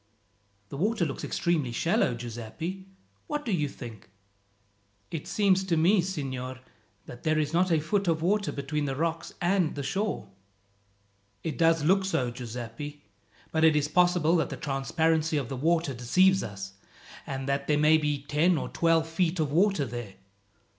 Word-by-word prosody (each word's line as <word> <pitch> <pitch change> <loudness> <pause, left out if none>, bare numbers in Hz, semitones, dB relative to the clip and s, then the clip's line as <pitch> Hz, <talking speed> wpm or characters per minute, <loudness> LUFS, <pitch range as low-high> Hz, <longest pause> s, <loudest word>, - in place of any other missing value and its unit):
"The - - -6
water 205 +2 +1
looks 140 - -5
extremely 155 -8 0
shallow, 165 - +1
Giuseppi. 120 - -6 0.4
What 295 0 -3
do 230 - -1
you 150 -6 0
think?" 115 -8 -10 1.0
"It 160 - -5
seems 195 -2 +2
to 170 -3 +1
me, 180 +5 +4
signor, 130 -8 -4 0.5
that 120 - -10
there 155 -1 +1
is 155 0 0
not 180 +2 +2
a 160 - +4
foot 195 +6 0
of 160 -1 +1
water 200 +3 +1
between 145 +2 -2
the 135 -1 -2
rocks 165 +2 -2
and 180 -2 +1
the 140 - -4
shore." 195 - -2 1.2
"It 160 - -3
does 165 -2 +3
look 190 +5 +4
so, 130 -10 0
Giuseppi; 125 +4 -7 0.5
but 160 0 +1
it 160 -1 +6
is 150 -1 +2
possible 175 0 +3
that 160 - 0
the - - -5
transparency 160 +3 0
of 135 -5 -2
the 135 - -3
water 160 +2 +1
deceives 185 +11 +3
us, 95 -2 -6 0.5
and 135 0 -4
that 140 0 -1
there 150 - +3
may 155 +1 +5
be 150 -2 -1
ten 155 +4 +2
or - - -3
twelve 165 -1 +2
feet 165 +1 0
of 150 -3 0
water 180 -2 +3
there. 120 -5 -7
155 Hz, 165 wpm, -28 LUFS, 135-175 Hz, 1.2 s, it